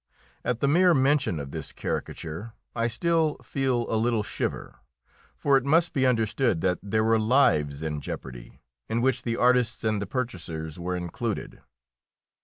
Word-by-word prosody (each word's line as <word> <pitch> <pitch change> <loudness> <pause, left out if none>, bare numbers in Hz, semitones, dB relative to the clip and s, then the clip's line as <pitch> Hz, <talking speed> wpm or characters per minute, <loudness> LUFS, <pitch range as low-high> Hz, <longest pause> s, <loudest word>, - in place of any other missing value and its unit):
At 120 -2 -1
the 140 - +3
mere 175 +4 +5
mention 135 - +2
of 70 -1 -6
this 80 -2 -5
caricature 85 +8 -5 0.2
I 115 0 +1
still 160 +4 +1
feel 130 -3 0
a - - -3
little 115 -2 +1
shiver; - - -4 0.6
for 140 -1 +3
it 135 - -1
must 160 +5 +3
be 130 -2 +2
understood 115 -5 +1
that 90 -1 +1
there 110 +2 0
were 110 0 +3
lives 80 - +2
in 75 -2 -3
jeopardy, - - -8 0.3
in 115 +1 0
which 125 -1 +1
the 115 -1 -2
artists' 125 -2 +2
and 110 -2 0
the 100 - -3
purchasers' 85 - -4
were 90 +1 -2
included. 90 +5 -4
115 Hz, 160 wpm, -26 LUFS, 90-130 Hz, 0.6 s, mere